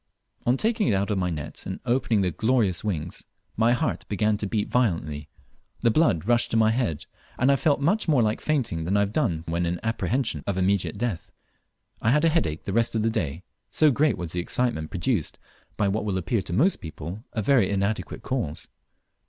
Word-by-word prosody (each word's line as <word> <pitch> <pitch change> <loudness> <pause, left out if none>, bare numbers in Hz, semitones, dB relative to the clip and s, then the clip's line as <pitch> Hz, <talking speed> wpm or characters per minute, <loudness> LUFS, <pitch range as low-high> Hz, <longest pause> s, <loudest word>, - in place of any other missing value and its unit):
On 125 +2 +4
taking 225 - +1
it 110 - +3
out 100 +2 0
of 100 - 0
my 90 -1 0
net 75 -2 -6
and 95 - -4
opening 120 -4 +2
the 90 -2 +1
glorious 110 -3 +1
wings, 85 -8 -3 0.3
my 115 +2 +3
heart 150 +5 -1
began 105 +1 +1
to 105 - -3
beat 105 +1 -1
violently, 80 - 0 0.5
the 115 - +4
blood 110 - +2
rushed 120 0 +3
to 115 - +1
my 110 0 +4
head, 110 - -1 0.3
and 130 +3 +4
I - - +5
felt 145 +1 +2
much 180 +10 +1
more 140 -7 +4
like 110 0 0
fainting 130 - 0
than 95 +5 +1
I - - +4
have 100 +1 -1
done 90 - 0
when 85 +1 0
in 85 0 -2
apprehension 115 - -1
of 100 -2 -1
immediate 95 +2 +1
death. 110 -6 -3 0.7
I 110 - +2
had 150 +6 +4
a - - +5
headache 85 - 0
the 95 - -4
rest 115 +1 +1
of 110 - +1
the 115 - +2
day, 85 -6 -3 0.3
so 155 -2 +4
great 145 +3 +2
was 85 -2 -5
the 90 - -2
excitement 90 -4 -1
produced 95 - -1 0.4
by 105 - +2
what 100 +2 0
will 100 -3 -1
appear 95 +4 0
to 85 - -8
most 155 - +3
people 85 +5 -7
a 110 - -1
very 120 -4 +4
inadequate 100 +2 -2
cause. 120 - -3
105 Hz, 210 wpm, -25 LUFS, 90-125 Hz, 0.7 s, I